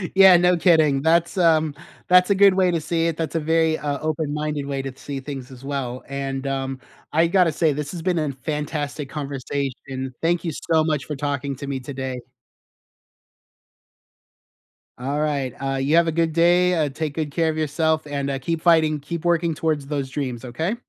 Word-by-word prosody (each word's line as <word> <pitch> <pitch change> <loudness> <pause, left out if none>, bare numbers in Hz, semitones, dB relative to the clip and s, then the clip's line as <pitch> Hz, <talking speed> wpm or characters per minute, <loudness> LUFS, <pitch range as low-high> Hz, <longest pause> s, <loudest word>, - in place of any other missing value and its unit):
Yeah, 190 -2 +8
no 180 +1 +4
kidding, 155 -6 +4
that's, 170 +4 +2
um 160 -4 +3 0.3
that's 180 +1 +5
a 200 - +4
good 200 -1 +6
way 185 -1 +3
to 165 - 0
see 165 +1 0
it. 165 - -2
That's 165 -1 -3
a - - +2
very, 160 0 +1
uh, 145 -1 -2
open 155 -1 -1
minded 150 -2 -3
way 135 -1 -3
to 135 -1 -6
see 140 0 -6
things 135 -2 -7
as 130 +1 -12
well, 130 -3 -4
and, 135 0 -4
um, 135 -1 -3 0.3
I 160 +2 +3
gotta 180 -2 +3
say 155 -1 +1
this 150 0 -4
has 175 -3 -6
been 180 -3 +1
an 150 -3 -1
fantastic 150 0 -4
conversation. 135 -2 -4
Thank 170 +1 +1
you 165 - -1 0.2
so 160 -1 +5
much 150 -4 -1
for 150 - -4
talking 140 -1 -2
to 140 - -7
me 135 -1 -3
today. 130 -1 -5 2.8
Alright, 140 -1 -1
uh, 135 0 -2
you 140 +4 +1
have 170 -1 +5
a - - +1
good 165 0 0
day, 175 +2 +4
uh, 155 -3 +1
take 145 +1 -4
good 155 -3 -2
care 165 +2 +1
of 155 - -2
yourself, 155 +1 0
and, 140 -1 -3
uh, 135 - -1
keep 165 +4 -3
fighting. 160 -3 +4
Keep 170 +3 -6
working 170 -2 +2
towards 150 -3 -1
those 140 -2 -2
dreams, 130 -4 -4
okay? 160 - -2
150 Hz, 190 wpm, -22 LUFS, 140-165 Hz, 2.8 s, Yeah